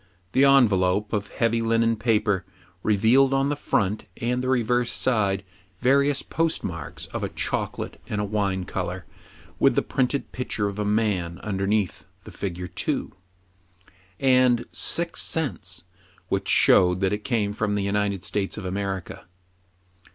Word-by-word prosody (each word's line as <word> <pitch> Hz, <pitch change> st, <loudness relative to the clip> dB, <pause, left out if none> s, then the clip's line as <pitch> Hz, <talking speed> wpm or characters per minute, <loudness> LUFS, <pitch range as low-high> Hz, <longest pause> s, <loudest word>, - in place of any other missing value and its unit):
The 135 Hz, +6 st, +4 dB
envelope, 105 Hz, -7 st, +3 dB
of 105 Hz, -1 st, -1 dB
heavy 115 Hz, +1 st, 0 dB
linen 115 Hz, 0 st, +2 dB
paper, 105 Hz, -4 st, +1 dB, 0.4 s
revealed 115 Hz, +7 st, +3 dB
on 135 Hz, +1 st, +1 dB
the 145 Hz, -, 0 dB
front 105 Hz, -7 st, -1 dB
and 125 Hz, +1 st, -1 dB
the 130 Hz, -, -1 dB
reverse 120 Hz, -1 st, +1 dB
side 100 Hz, -6 st, +1 dB, 0.4 s
variou3 140 Hz, +2 st, +3 dB
postmarks 90 Hz, -, -3 dB
of -, -, -3 dB
a -, -, -2 dB
chocolate -, -, -4 dB
and 105 Hz, -3 st, -2 dB
a -, -, 0 dB
wine 100 Hz, -3 st, -1 dB
color, -, -, -4 dB, 0.5 s
with -, -, +4 dB
the -, -, +2 dB
printed 135 Hz, +2 st, -1 dB
picture 115 Hz, -4 st, -2 dB
of 100 Hz, +1 st, -5 dB
a 105 Hz, -, -1 dB
man 100 Hz, -5 st, 0 dB
under 95 Hz, -2 st, -2 dB
neath 105 Hz, -3 st, -1 dB, 0.2 s
the -, -, -11 dB
figure 90 Hz, -2 st, -5 dB
2, 90 Hz, -1 st, -3 dB, 1.1 s
and 125 Hz, -2 st, +3 dB
"six 170 Hz, 0 st, +2 dB
cents," 160 Hz, -4 st, -2 dB, 0.5 s
which -, -, -1 dB
showed 90 Hz, 0 st, +5 dB
that 95 Hz, 0 st, +1 dB
it 105 Hz, 0 st, -3 dB
came 110 Hz, -5 st, 0 dB
from 105 Hz, -1 st, -1 dB
the 100 Hz, -, -1 dB
United 100 Hz, -1 st, -1 dB
States 100 Hz, +3 st, -2 dB
of 105 Hz, -, -6 dB
America. 95 Hz, -1 st, -4 dB
105 Hz, 145 wpm, -24 LUFS, 100-125 Hz, 1.1 s, showed